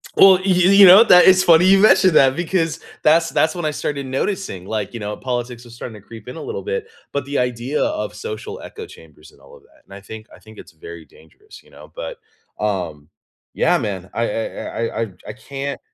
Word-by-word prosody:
Well, 190 -1 +7
y - - -10
you 190 +2 +5
know, 190 +5 +9
that 180 -5 +6
is 185 0 +5
funny 170 0 +5
you 195 +1 +5
mentioned 190 -3 +4
that 135 0 +4
because 165 -2 -2 0.2
that's 165 +2 +3
that's 155 0 +1
when 175 -2 -5
I 155 - 0
started 140 -1 -4
noticing, 130 - -4
like, 105 0 -4
you 115 - -7
know, 105 0 -5
politics 120 -1 -5
are - - -14
starting 115 -2 -10
to - - -30
creep 115 -1 -13
in 125 - -8
a - - -8
little - - -6
bit, 455 +1 -4 0.2
but 140 -2 -3
the 140 +1 -4
idea 125 +3 -2
of 310 +2 -4
social 440 0 -7
echo 445 0 -10
chambers - - -17
and - - -24
all 485 - -17
of 460 - -20
that, 310 -7 -27
and - - -16
I 100 - -11
think 110 +2 -11
I - - -16
think 110 0 -17
it's - - -13
very 85 0 -12
dangerous, 420 - -19
you - - -25
know, - - -16
but, - - -7 0.4
um 85 -8 -4 0.4
yeah, - - +2
man, 95 -2 -5
I 115 0 -2
I 110 +2 -5
I 115 0 -4
I 115 -3 -4 0.2
I - - -6
can't 140 +3 -7
140 Hz, 225 wpm, -19 LUFS, -, 0.4 s, know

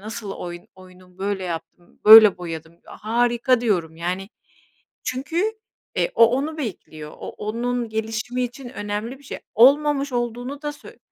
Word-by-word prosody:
nasıl 210 -1 -6
oyun 175 -2 -8
oyunum? 185 -1 -18
Böyle 195 -1 -2
yaptım, 175 0 -8
böyle 215 -2 +10
boyadım." 165 -2 -7
diyor, 170 - -15
"Harika!" 240 +2 +2
diyorum. 175 -9 -1
Yani 180 +3 -3 0.8
çünkü 280 +8 -2 0.5
e, - - +1
o, 230 - +8
onu 310 +3 -3
bekliyor, 160 - -7
o - - -6
onun 235 +2 -3
gelişimi 220 +3 -3
için 245 +1 -6
önemli 210 +1 -5
bir - - -20
şey. - - -7 0.2
Olmamış 280 +3 +4
olduğunu 245 +3 -3
da 295 -1 -3
söy 290 - -14
225 Hz, 145 wpm, -22 LUFS, 185-250 Hz, 0.8 s, böyle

